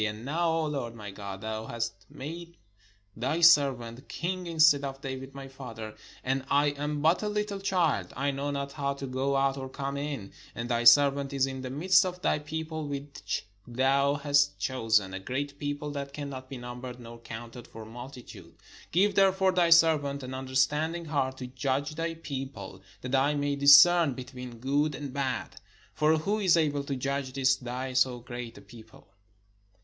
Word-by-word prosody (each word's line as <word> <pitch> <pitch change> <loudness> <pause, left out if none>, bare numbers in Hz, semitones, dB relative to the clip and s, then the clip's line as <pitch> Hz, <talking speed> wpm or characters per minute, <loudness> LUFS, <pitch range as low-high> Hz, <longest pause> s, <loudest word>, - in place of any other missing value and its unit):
And 105 +2 -3
now, 165 +4 0
O 160 -1 +1
Lord 135 -6 -3
my 105 -3 -8
God, 100 -1 -7
thou 110 0 -4
hast 115 0 -5
made 170 +4 -8 0.6
thy 130 +8 -1
servant 135 -6 +4
king 180 +1 -3
instead 155 -3 +5
of 135 -1 -5
David 135 -1 -6
my 135 0 -7
father: 115 -5 -8 0.3
and 135 +1 0
I 145 +1 +4
am 145 +1 -3
but 165 +3 +4
a 210 - -1
little 210 -1 -2
child: 180 -6 0
I 140 +2 +1
know 140 +1 -3
not 140 -1 -3
how 140 -1 -2
to 140 - -6
go 135 +1 -1
out 135 0 +1
or 130 -1 -5
come 140 +1 -4
in. 140 -8 -4 0.2
And 115 0 -4
thy 120 0 0
servant 140 +3 +6
is 135 -1 +2
in 135 -1 -5
the 130 - -5
midst 175 +10 +4
of 180 -1 -4
thy - - +2
people 160 0 -5
which 140 -4 -4 0.2
thou 135 +3 +2
hast 145 0 +2
chosen, 110 -7 +1
a 95 - -4
great 140 +7 -4
people, 145 0 -3
that 140 -1 -5
cannot 140 -3 -6
be 135 - -6
numbered 125 +1 -8
nor 115 -1 -11
counted 115 +1 -9
for 110 0 -10
mul 120 +4 -9
titude. 100 -10 -12 0.4
Give 200 +4 +3
therefore 190 -1 +4
thy 180 -2 +3
servant 155 -4 +4
an 130 +1 -6
understanding 145 +6 0
heart 135 -4 -1
to 130 - -6
judge 135 +3 -2
thy 165 +1 -3
people, 135 -11 -7 0.2
that 125 +1 -6
I 140 +2 +3
may 145 0 0
discern 145 +2 +7
between 125 -1 -8
good 140 +4 0
and 140 -3 -6
bad: 135 -2 -3 0.3
for 155 +1 +3
who 200 +7 -1
is 185 -4 +4
able 145 -3 +1
to 140 - -2
judge 135 0 -3
this 130 0 +3
thy 130 +1 -5
so 130 -1 +2
great 120 -1 -8
a - - -11
people?" 110 -2 -15
140 Hz, 185 wpm, -28 LUFS, 125-150 Hz, 0.6 s, discern